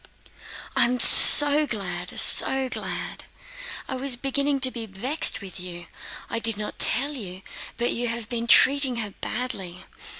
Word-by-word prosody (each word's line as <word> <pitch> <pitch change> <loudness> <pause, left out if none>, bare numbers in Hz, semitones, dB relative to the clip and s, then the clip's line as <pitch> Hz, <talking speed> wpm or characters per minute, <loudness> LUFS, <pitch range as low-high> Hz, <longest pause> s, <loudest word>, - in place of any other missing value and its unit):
"I - - 0
am 250 +1 -4
so 290 +3 +7
glad, 180 -6 -7
so 265 -1 +3
glad! - - -8 0.6
I 265 - -8
was 260 0 -2
beginning 275 +2 -4
to 260 -1 +1
be 230 -2 -10
vexed 245 +10 -4
with 190 -2 -13
you. 175 -1 -12 0.4
I - - -6
did 225 -2 -1
not 210 0 -10
tell 275 +6 +3
you, 190 -8 -11 0.3
but 240 +1 -4
you 240 +1 -6
have 230 -1 -8
been 235 -1 -7
treating 270 +1 +1
her 215 -3 -8
badly. 195 -7 -10
235 Hz, 155 wpm, -21 LUFS, 200-265 Hz, 0.6 s, so